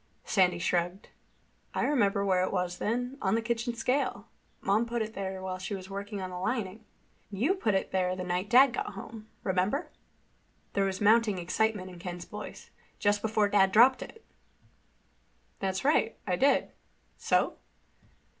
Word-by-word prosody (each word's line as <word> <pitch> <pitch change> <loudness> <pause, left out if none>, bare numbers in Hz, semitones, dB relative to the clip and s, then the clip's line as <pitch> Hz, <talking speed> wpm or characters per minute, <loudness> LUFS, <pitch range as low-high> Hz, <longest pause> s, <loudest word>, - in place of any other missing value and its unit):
Sandy 180 -3 +3
shrugged. 175 +2 -1 0.7
"I - - +1
remember 200 -8 +2
where 185 -2 +3
it - - -1
was 180 -2 -2
then—on 245 -2 -1
the - - +2
kitchen 235 +1 -2
scale. 250 -3 -1 0.3
Mom 210 +4 +1
put 235 -1 -1
it 220 0 -7
there 190 -1 -4
while 185 -1 -4
she 195 +2 -4
was 190 0 -9
working 200 +1 -5
on 185 -1 -5
the 180 - -5
lining." 220 -1 -2 0.5
"And 195 -2 -7
you 290 - +3
put 225 - 0
it 190 - -1
there 185 -1 +1
the 185 - -4
night 180 +2 -2
Dad 255 +2 +7
got 210 - -3
home. 215 +2 -9 0.2
Remember?" 190 - 0 0.8
There 200 -1 +2
was 190 0 -3
mounting 215 -1 +4
excitement 185 +2 -1
in 175 - -11
Ken's 175 -1 -6
voice. 210 0 -9 0.3
"Just 205 0 +1
before 215 -1 +2
Dad 195 -2 +4
dropped 245 +6 +6
it." 450 - -10 1.3
"That's 190 +3 -2
right. 275 -6 +2
I 180 - +1
did. 275 +9 +2 0.5
So?" - - +1
200 Hz, 165 wpm, -29 LUFS, 185-230 Hz, 1.3 s, Dad